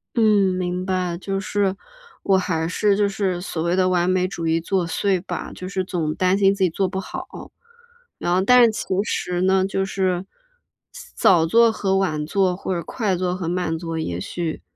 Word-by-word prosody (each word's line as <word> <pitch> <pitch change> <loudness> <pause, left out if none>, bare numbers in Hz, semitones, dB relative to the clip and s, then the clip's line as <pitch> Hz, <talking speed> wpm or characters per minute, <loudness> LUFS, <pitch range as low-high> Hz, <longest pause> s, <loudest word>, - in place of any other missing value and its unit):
嗯， 210 -5 +3
明 180 0 -2
白， 185 -2 -1
就 195 +1 -3
是 195 0 -1 0.5
我 195 -1 +4
还 165 -3 -1
是 200 +3 +1
就 205 -1 +2
是 195 -3 -2
所 165 -3 -4
谓 170 +1 0
的 185 -1 +3
完 180 0 +2
美 185 0 +2
主 175 -3 -6
义 165 +1 +2
作 180 +1 0
祟 190 -1 0
吧。 - - -5
就 185 - -7
是 190 -1 -2
总 165 -4 -2
担 185 +1 +2
心 195 -1 +4
自 195 -1 0
己 180 - +2
做 190 +3 -1
不 190 +1 -4
好， - - -6 0.9
然 175 - 0
后 185 - +3
但 250 +5 +6
是 225 - +3
其 210 - -5 0.2
实 180 -4 -2
呢 190 0 +3
就 195 0 -1
是 185 -1 -1 0.9
早 165 -3 +4
做 230 +6 +5
和 195 -3 0
晚 155 -6 0
做 185 +1 +1
或 185 0 -3
者 170 - -3
快 200 +2 -2
做 180 0 -1
和 175 -3 -4
慢 175 -2 -1
做， 165 -1 -4
也 90 - -3
许， 165 - -4
185 Hz, 215 characters per minute, -22 LUFS, 175-195 Hz, 0.9 s, 但